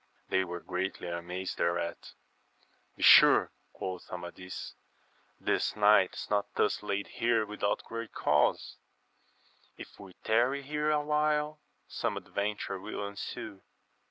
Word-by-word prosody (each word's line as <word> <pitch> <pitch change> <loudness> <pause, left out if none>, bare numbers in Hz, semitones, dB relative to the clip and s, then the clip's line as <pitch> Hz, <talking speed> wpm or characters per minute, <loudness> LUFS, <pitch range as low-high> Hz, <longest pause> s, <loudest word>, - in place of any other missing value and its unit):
They 95 0 +2
were 90 -1 -6
greatly 90 -1 -3
amazed 90 +2 -5
thereat. 85 0 -2 0.8
Besure, - - +7 0.2
quoth 95 -1 -6
Amadis, 90 +1 -7 0.7
this - - 0
knight 105 -3 +5
is - - -6
not 105 -1 0
thus - - +1
laid 100 +1 -2
here 115 -2 +1
without 105 -1 -2
great 115 0 -6
cause; 75 0 +1 1.0
if - - -11
we 95 -2 -11
tarry 125 +5 +2
here 150 +2 -1
awhile 150 0 +1 0.3
some - - -2
adventure 100 -1 -3
will 100 - -5
ensue. 100 -1 -7
100 Hz, 115 wpm, -30 LUFS, 90-120 Hz, 1.0 s, Besure